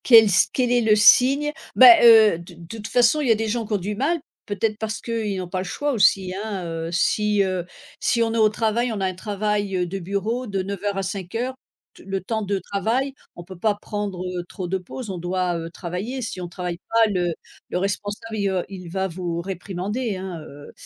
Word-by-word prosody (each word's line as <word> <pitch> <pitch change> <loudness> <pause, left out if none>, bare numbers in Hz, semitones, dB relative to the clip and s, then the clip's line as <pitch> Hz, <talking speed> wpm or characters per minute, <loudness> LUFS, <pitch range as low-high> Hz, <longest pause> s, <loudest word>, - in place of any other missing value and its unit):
Quel 230 -3 +9
s 185 - +4
quel 250 -2 0
est 245 0 +4
le 220 -2 +4
signe, 260 +7 +6
heu, - - -3 0.2
bah, 245 -3 +9
heu, 220 -6 +7
d 170 0 -12
de 170 0 -13
toute 215 0 -6
façon, 245 +5 +3
il 285 - -1
y - - +5
a - - +5
des 220 +1 -2
gens 225 +1 -1
qu'ont 210 - 0
du 200 +3 -4
mal, 300 +9 0 0.3
peut-être 210 +1 -1
parce 220 0 -3
qu'ils 220 -4 -3
n'ont 185 -1 -4
pas 185 +1 -3
le - - -2
choix 290 +10 -2
aussi, 190 -4 +3
hein, 200 -5 -4
heu, 165 0 -4
si, 210 +3 +2
heu, 185 -2 -2 0.3
si 235 - +2
on 225 0 -1
est - - -1
au 215 -1 +5
travail, 230 +3 0
on 215 - -3
a 190 - 0
un 185 - -1
travail, 205 +1 -2
heu, 180 - +1
de 190 +3 -5
bureau 200 +7 -2
de 195 -2 -2
09:00 200 +1 -3
à 195 - -1
17:00, 200 +7 -3 0.4
t - - -16
le 195 0 -2
temps 220 +3 -2
de 200 -1 -1
travail, 225 +9 -1 0.2
on 175 - -9
peut 185 +1 -11
pas 210 +1 +2
prendre, 205 -3 -5
heu, 180 -1 -4
trop 185 -3 -5
de 190 +2 -1
pauses, 205 +4 -7
on 185 - -5
doit, 180 0 -1
heu, 165 0 -6
travailler. 185 +10 -5
Si 210 - -5
on 175 - -4
travaille 175 0 -5
pas, 225 -1 +3
le 175 -2 0 0.4
le - - -2
responsable, 205 +3 -3
il 200 -1 0
v 190 -1 0
il 185 -3 -9
va 190 +2 -1
vous 170 -1 -4
réprimander 195 +5 -4
hein, 185 -2 -6
heu 145 -1 -12
heu, - - -12
200 Hz, 235 wpm, -23 LUFS, 185-225 Hz, 0.4 s, Quel